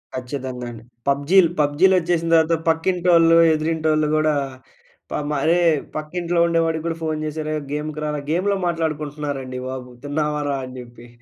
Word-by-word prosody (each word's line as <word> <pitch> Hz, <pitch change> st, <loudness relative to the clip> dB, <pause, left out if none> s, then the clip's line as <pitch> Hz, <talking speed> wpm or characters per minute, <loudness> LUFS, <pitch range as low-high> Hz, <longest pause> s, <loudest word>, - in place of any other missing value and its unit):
ఖచ్చితంగా 130 Hz, -1 st, -5 dB
అండి. 115 Hz, -1 st, -11 dB, 0.2 s
పబ్జీలు, 160 Hz, +6 st, +4 dB
పబ్జీలు 150 Hz, +7 st, +3 dB
వచ్చేసిన 170 Hz, -1 st, -1 dB
తర్వాత 160 Hz, +1 st, +4 dB
పక్కింటోళ్ళు 165 Hz, 0 st, +4 dB, 0.2 s
ఎదురింటోళ్ళు 155 Hz, -1 st, +1 dB
కూడా 155 Hz, 0 st, +2 dB, 0.8 s
ప -, -, -4 dB, 0.3 s
అరే! 170 Hz, +3 st, +3 dB, 0.4 s
పక్కింట్లో 170 Hz, +3 st, -2 dB
ఉండేవాడికి 165 Hz, -1 st, 0 dB
కూడా 165 Hz, -, -2 dB
ఫోన్ 155 Hz, -1 st, -1 dB
చేసి 155 Hz, +1 st, -4 dB
అరే! 155 Hz, 0 st, -3 dB, 0.2 s
గేమ్‌కి 150 Hz, +1 st, -4 dB
రారా 150 Hz, -1 st, -2 dB
గేమ్‌లో 195 Hz, +4 st, +1 dB
మాట్లాడుకుంటున్నారండి 150 Hz, -5 st, -3 dB
బాబు! 130 Hz, -1 st, -6 dB, 0.2 s
తిన్నావారా 150 Hz, -1 st, -1 dB
అని 130 Hz, 0 st, -10 dB
చెప్పి. 120 Hz, -1 st, -12 dB
155 Hz, 135 wpm, -21 LUFS, 145-165 Hz, 0.8 s, పబ్జీలు